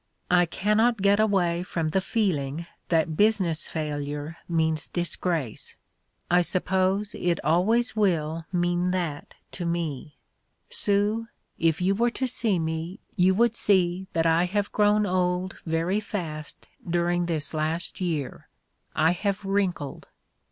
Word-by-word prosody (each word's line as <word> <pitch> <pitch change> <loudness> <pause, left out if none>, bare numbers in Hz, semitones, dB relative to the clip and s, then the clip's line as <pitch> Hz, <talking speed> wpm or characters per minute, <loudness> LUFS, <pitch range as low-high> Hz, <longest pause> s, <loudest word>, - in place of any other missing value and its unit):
"I 175 -1 +5
cannot 220 +6 +2
get 200 +1 +4
away 185 -5 +2
from 165 -3 -2
the 190 +4 +1
feeling 170 -8 -1 0.2
that 160 -2 +2
business 190 -5 +2
failure 150 0 -4
means 160 -2 0
disgrace. 170 - -2 0.6
I 175 0 +5
suppose 190 +3 +1
it 175 -2 0
always 215 +10 +2
will 165 -6 0
mean 175 0 +1
that 170 -6 -3 0.2
to 180 - -6
me. 165 -4 -3 0.5
Sue, 210 +3 +2 0.3
if 165 0 +2
you 190 +2 +3
were 235 +4 +2
to 260 +2 -2
see 230 -6 +1
me 160 +3 -3 0.2
you 185 -1 +4
would 230 +2 +3
see 190 -3 +2
that 165 0 +1
I 165 +2 +4
have 200 +2 -1
grown 210 0 +3
old 180 0 -1
very 165 +5 +1
fast 165 -8 -6 0.2
during 175 0 +1
this 155 -3 0
last 160 +4 -2
year: 160 -7 -3 0.5
I 160 +1 +4
have 200 +2 -2
wrinkled. 190 -7 -1
175 Hz, 130 wpm, -26 LUFS, 160-200 Hz, 0.6 s, I